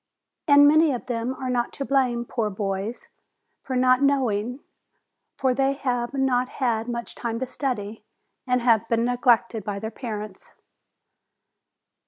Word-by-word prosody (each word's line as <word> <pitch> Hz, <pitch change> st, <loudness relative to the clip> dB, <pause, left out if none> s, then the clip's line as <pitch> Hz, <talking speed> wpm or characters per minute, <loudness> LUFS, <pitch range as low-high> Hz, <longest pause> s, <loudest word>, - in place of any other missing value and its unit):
And 285 Hz, -1 st, +7 dB
many 310 Hz, +1 st, +5 dB
of 245 Hz, -, -5 dB
them 240 Hz, +1 st, -2 dB
are 260 Hz, -1 st, -4 dB
not 240 Hz, -1 st, 0 dB
to 275 Hz, -, -4 dB
blame, 250 Hz, -4 st, +1 dB
poor 230 Hz, -3 st, -2 dB
boys, 195 Hz, +2 st, -4 dB, 0.5 s
for 260 Hz, -, -4 dB
not 255 Hz, +1 st, +4 dB
knowing, 250 Hz, -3 st, +1 dB, 0.8 s
for 260 Hz, -2 st, +1 dB
they 270 Hz, +1 st, +1 dB
have 250 Hz, -2 st, -2 dB
not 255 Hz, -2 st, +1 dB
had 230 Hz, -3 st, -1 dB
much 235 Hz, -1 st, -5 dB
time 230 Hz, -1 st, -4 dB
to 260 Hz, -, -2 dB
study, 225 Hz, -5 st, -4 dB, 0.4 s
and 250 Hz, 0 st, +2 dB
have 230 Hz, -2 st, +3 dB
been 230 Hz, 0 st, +2 dB
neg 245 Hz, 0 st, -3 dB
lected 235 Hz, -2 st, +3 dB
by 200 Hz, 0 st, -4 dB
their 220 Hz, +2 st, -5 dB
parents. 215 Hz, -4 st, -7 dB
245 Hz, 150 wpm, -24 LUFS, 225-260 Hz, 0.8 s, And